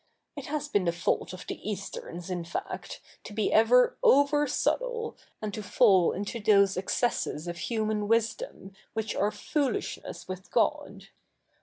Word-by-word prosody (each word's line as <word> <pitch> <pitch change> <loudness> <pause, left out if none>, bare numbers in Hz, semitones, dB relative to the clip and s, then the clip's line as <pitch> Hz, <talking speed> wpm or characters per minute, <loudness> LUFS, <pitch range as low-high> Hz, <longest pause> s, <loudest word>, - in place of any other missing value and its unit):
It - - -7
has 295 0 -2
been 205 -10 +1
the 170 - +3
fault 170 +1 -1
of 185 - -9
the - - -5
Easterns, 185 -3 -6
in 175 -1 -2
fact, 170 - -6 0.2
to - - -9
be 215 0 0
ever 245 +3 +5
over 290 +2 +5
subtle, 480 - -1 0.3
and 210 -1 -3
to 215 - -4
fall 190 -2 +4
into 205 +4 -4
those 200 -2 +4
excesses 185 -4 -1
of 175 0 -5
human 215 +1 -1
wisdom 230 - -1 0.2
which 220 -1 -2
are 205 - +2
foolishness 270 +6 -3
with 185 +1 -7
God. - - -1
210 Hz, 150 wpm, -28 LUFS, 185-250 Hz, 0.3 s, ever